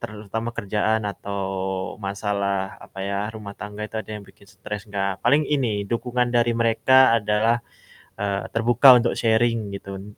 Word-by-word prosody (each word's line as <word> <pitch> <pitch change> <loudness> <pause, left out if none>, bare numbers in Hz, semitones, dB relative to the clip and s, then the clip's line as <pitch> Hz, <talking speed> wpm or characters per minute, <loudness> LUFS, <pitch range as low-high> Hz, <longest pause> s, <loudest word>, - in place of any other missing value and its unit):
terutama 110 +2 -5
kerjaan 110 0 0
atau 100 0 -5 0.6
masalah 100 -1 -2
apa 95 - -10
ya, 100 +1 -2
rumah 105 -2 -9
tangga 105 0 -8
itu 110 +1 -5
ada 110 -1 -6
yang 105 - -6
bikin 100 0 -19
stres 105 +1 -8
gak 100 -2 -2
paling 145 +2 +5
ini 115 -9 0
dukungan 125 +1 0
dari 120 -1 +2
mereka 115 +2 +4
adalah, 110 +2 +2 0.6
eee, 100 -1 -2
terbuka 120 +3 +6
untuk 120 0 +1
sharing 115 -1 +1
gitu 100 0 -9
n - - -10
110 Hz, 155 wpm, -23 LUFS, 100-115 Hz, 0.6 s, terbuka